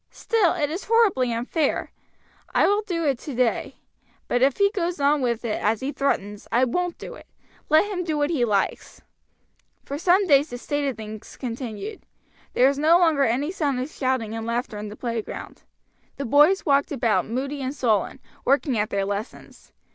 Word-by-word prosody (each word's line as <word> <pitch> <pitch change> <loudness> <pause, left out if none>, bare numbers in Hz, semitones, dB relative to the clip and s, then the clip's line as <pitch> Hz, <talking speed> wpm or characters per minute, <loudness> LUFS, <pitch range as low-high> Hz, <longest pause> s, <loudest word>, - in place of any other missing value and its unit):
Still, 440 -7 +1
it 300 -4 -1
is 350 +5 -5
horribly 405 - +3
unfair. 260 +6 -1 0.6
I - - +5
will 410 +1 +2
do 345 -6 -3
it 275 -4 +1
today. 250 -5 -1 0.5
But 245 - 0
if 270 0 +3
he 400 0 +3
goes 355 -5 -2
on 285 +1 +3
with 235 -2 -1
it, 215 - -2
as 215 +1 +1
he 270 +2 -2
threatens, 210 -8 -2
I 240 +3 +3
won't 355 +7 -2
do - - -8
it, - - -14 0.4
let 310 +5 +5
him 390 -3 -3
do 315 -3 -2
what 295 +2 +1
he 285 -7 +1
likes." 205 -4 -1 0.8
For 280 +1 -5
some 370 +4 +4
days 290 -2 +4
this 245 0 -8
state 290 -1 -1
of 265 - -3
things 215 0 -9
continued. 250 - -6 0.5
There 255 - +5
was 280 +1 0
no 320 +3 +5
longer 320 -6 +3
any 265 +8 0
sound 290 -8 -1
of 260 +4 -4
shouting 255 -5 -1
and 225 0 -5
laughter 235 -2 -2
in 210 - -5
the 210 - -9
playground. 230 -2 -5 0.6
The 280 - -3
boys 295 +10 +4
walked 280 -1 +2
about 230 -6 +1
moody 275 +5 -3
and 265 +2 -3
sullen, 225 -1 0 0.2
working 275 -3 +2
at 210 - 0
their 195 -1 -1
lessons. 205 +3 -7
275 Hz, 185 wpm, -24 LUFS, 235-320 Hz, 0.8 s, I